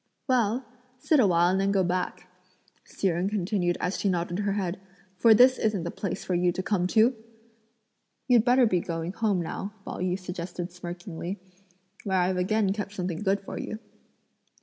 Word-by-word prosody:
"Well, 245 -1 +1 0.3
sit 290 +4 +2
a 225 - +5
while 175 0 +3
and 190 +1 +1
then 195 0 +1
go 195 -1 +2
back;" 180 0 -2 0.6
Hsi 195 - -1
Jen 175 +3 0
continued 185 -3 0
as 180 - -2
she 200 - +1
nodded 175 0 -1
her 200 -1 0
head; 190 -2 -2 0.4
"for 220 +4 +6
this 255 +3 +6
isn't 210 -5 0
the 170 - -3
place 195 - -4
for 185 - -1
you 175 0 +2
to 185 - -3
come 185 -3 +1
to!" 225 +6 +4 1.1
"You'd 240 -4 +5
better 250 +1 +5
be 185 -5 +2
going 165 0 -4
home 210 -4 +1
now," 200 +5 -5
Pao - - -6
yü 180 0 0
suggested 180 -1 -6
smirkingly; 175 +1 -6 0.7
"where 190 -2 0
I've 180 +1 +1
again 195 +2 +1
kept 205 -1 -5
something 180 -3 -3
good 195 -1 +1
for 195 - -7
you." 215 - -5
190 Hz, 180 wpm, -27 LUFS, 180-210 Hz, 1.1 s, for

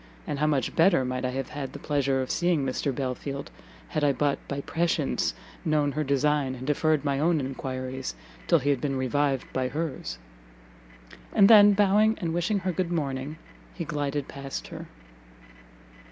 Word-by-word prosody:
and 140 - -3
how 150 - +2
much 140 -6 0
better 165 -5 +4
might 130 0 -3
I 130 - 0
have 135 0 -3
had 145 -3 -5
the - - -6
pleasure 140 -2 0
of 130 - -4
seeing 170 -5 +1
Mr 135 +2 -1
Belfield, 140 +1 -4 0.4
had 155 -3 -1
I 145 - +5
but, 145 0 0
by 140 0 -3
prescience, 165 -2 0 0.3
known 150 -2 +2
her 155 +2 -1
design, 140 -1 +1
and 130 0 -8
deferred 150 +1 +1
my 140 -1 +1
own 165 +1 +2
enquiries 130 -1 -4 0.3
till 170 - +5
he 145 -1 +1
had 135 -3 0
been 140 -2 -1
revived 135 +1 0
by 130 -1 0
hers!" 145 - -4 1.2
And 200 -2 +7
then, 205 -2 +8
bowing 210 +2 +4
and 170 -4 -2
wishing 175 +5 +1
her 185 -1 -1
good 180 0 -2
morning, 145 -2 -2 0.4
he - - -4
glided 145 -1 -2
past 140 -1 -6
her. - - -8
145 Hz, 170 wpm, -27 LUFS, 135-160 Hz, 1.2 s, then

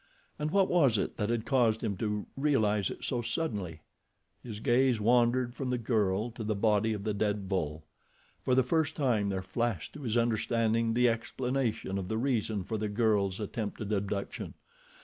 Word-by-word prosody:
And 150 +1 -1
what 195 +2 +3
was 140 -11 +4
it - - -2
that 105 - -1
had 115 -1 -1
caused 115 -5 +2
him 100 - -1
to 105 -1 -2
realize 110 -9 +2
it - - -8
so 120 -2 -1
suddenly? 105 - -3 0.6
His 110 -4 -7
gaze 125 +1 +3
wandered 120 +2 +3
from 130 0 -4
the 125 - +1
girl 110 -2 0
to 115 0 -7
the 110 0 -1
body 105 +1 +2
of 105 -2 -5
the 105 0 -1
dead 105 -1 -1
bull. 80 -5 -2 0.6
For 130 - +2
the 130 - +5
first 160 +4 0
time 115 -9 +1
there 95 -1 -2
flashed 105 -2 -2
to 150 - -9
his 120 -3 0
understanding 115 0 +1
the 125 0 +4
explanation 115 -3 -1
of 95 - -5
the 110 - -2
reason 115 -5 0
for 110 +4 -3
the 105 0 -1
girl's 105 -3 +1
attempted 105 0 -4
abduction. 100 0 -3
110 Hz, 180 wpm, -30 LUFS, 105-125 Hz, 0.6 s, the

